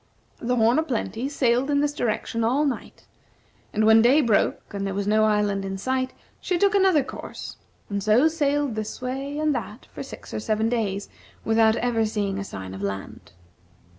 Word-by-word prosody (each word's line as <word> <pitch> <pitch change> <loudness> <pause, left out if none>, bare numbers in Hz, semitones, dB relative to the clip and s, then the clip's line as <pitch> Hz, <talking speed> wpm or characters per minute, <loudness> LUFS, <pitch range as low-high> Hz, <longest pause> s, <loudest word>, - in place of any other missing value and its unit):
The 245 +1 0
"Horn 235 +4 +4
o' - - +3
Plenty" 255 -3 -3
sailed 255 -1 +1
in 285 -1 +2
this 290 0 +1
direction 230 -2 -1
all 265 +7 +2
night, 275 -4 -4 0.7
and 215 0 +1
when 220 +1 +7
day 260 +6 +5
broke, 225 -3 +1
and 200 -1 -3
there 195 - -3
was 200 0 -1
no 215 +1 +3
island 205 -2 +1
in 195 0 -4
sight, 260 +5 -1 0.3
she 360 - -1
took 400 +3 +3
another 380 -7 +4
course; - - -8 0.3
and 200 -1 -3
so 215 +9 +4
sailed 290 -4 0
this 215 0 -5
way 270 +3 -4
and 305 -1 +1
that 230 -2 -5
for - - -7
six - - -10
or - - -2
seven 215 +1 0
days, 205 -4 -1 0.4
without 220 0 +4
ever 235 -1 +1
seeing 205 -2 -1
a - - -3
sign 95 - -7
of 95 - -7
land. 100 -2 -6
230 Hz, 190 wpm, -24 LUFS, 210-275 Hz, 0.7 s, when